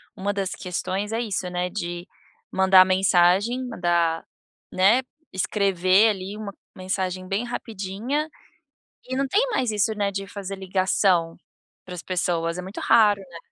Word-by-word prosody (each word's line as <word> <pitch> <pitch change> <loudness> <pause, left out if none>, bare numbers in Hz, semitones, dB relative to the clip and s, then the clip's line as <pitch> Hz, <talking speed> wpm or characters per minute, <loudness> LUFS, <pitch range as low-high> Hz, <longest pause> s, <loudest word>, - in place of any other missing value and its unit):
uma 200 +2 -2
das 195 -2 -2
questões 185 +3 -3
é 225 - -1
isso, 200 -6 -3
né, 180 0 -2
de 175 -2 -5 0.4
mandar 190 -1 +6
mensagem, 190 +6 +3
mandar, 170 -7 0 0.5
né, 200 +7 +4 0.3
escrever 190 +1 +3
ali 195 0 -4
uma 210 -2 -6 0.2
mensagem 185 0 -3
bem 195 +4 -1
rapidinha 230 +6 -4 0.8
e 255 - -5
não 275 0 0
tem 405 - +3
mais 255 - 0
isso, 210 +1 +1
né, 205 -1 0
de 195 0 -5
fazer 195 0 -7
ligação 185 -2 +1 0.5
pra 180 - -8
as 175 - -7
pessoas, 175 -2 -1
é - - -4
muito 190 +3 -7
raro, 210 -3 +4
né. 175 -3 -11
190 Hz, 145 wpm, -24 LUFS, 180-210 Hz, 0.8 s, mandar